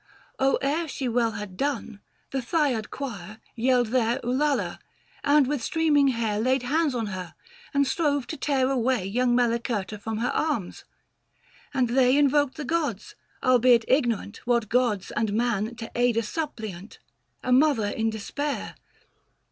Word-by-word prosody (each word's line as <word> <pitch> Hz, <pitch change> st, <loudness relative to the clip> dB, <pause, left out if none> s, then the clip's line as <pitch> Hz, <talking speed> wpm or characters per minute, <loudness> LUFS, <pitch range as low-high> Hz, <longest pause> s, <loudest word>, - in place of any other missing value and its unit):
610 270 Hz, -, +4 dB, 0.2 s
Or 295 Hz, +4 st, +1 dB
ere 335 Hz, -, -5 dB
she 270 Hz, -2 st, -4 dB
well 235 Hz, -1 st, +1 dB
had 205 Hz, -4 st, -7 dB
done, 270 Hz, -5 st, -3 dB, 0.3 s
the 270 Hz, -, -1 dB
Thyad 255 Hz, -5 st, 0 dB
choir 215 Hz, -6 st, -7 dB, 0.2 s
Yelled 245 Hz, 0 st, +2 dB
their 240 Hz, 0 st, +1 dB
ulalah! 275 Hz, +4 st, 0 dB, 0.4 s
and 290 Hz, -1 st, +5 dB
with 285 Hz, -1 st, -2 dB
streaming 295 Hz, 0 st, +2 dB
hair 230 Hz, -5 st, 0 dB
Laid 255 Hz, +3 st, +1 dB
hands 295 Hz, +1 st, +1 dB
on 230 Hz, -2 st, -1 dB
her, 180 Hz, -4 st, -7 dB, 0.4 s
and 280 Hz, 0 st, +2 dB
strove 285 Hz, -1 st, 0 dB
to 315 Hz, -, -5 dB
tear 270 Hz, -4 st, +1 dB
away 250 Hz, -5 st, +1 dB
Young 240 Hz, +4 st, +1 dB
Melicerta 230 Hz, -4 st, -1 dB
from 220 Hz, +1 st, -4 dB
her 235 Hz, +3 st, 0 dB
arms: 285 Hz, -, -2 dB, 0.9 s
and 260 Hz, -4 st, +1 dB
they 255 Hz, +2 st, +4 dB
Invoked 290 Hz, -1 st, +3 dB
the 300 Hz, -, -4 dB
gods, 320 Hz, -, -2 dB, 0.3 s
albeit 250 Hz, -2 st, +5 dB
ignorant 235 Hz, -6 st, +1 dB
615 245 Hz, -, -4 dB
What 235 Hz, -3 st, +1 dB
gods, 230 Hz, -6 st, +1 dB
and 215 Hz, -2 st, 0 dB
man 230 Hz, 0 st, 0 dB
to 225 Hz, -1 st, -8 dB
aid 240 Hz, -1 st, +2 dB
a 230 Hz, -, +2 dB
suppliant 220 Hz, -, -5 dB, 0.2 s
— -, -, -45 dB
A 255 Hz, -, -1 dB
mother 260 Hz, -4 st, +4 dB
in 225 Hz, +2 st, -1 dB
despair. 275 Hz, +7 st, -4 dB
245 Hz, 160 wpm, -26 LUFS, 225-280 Hz, 0.9 s, and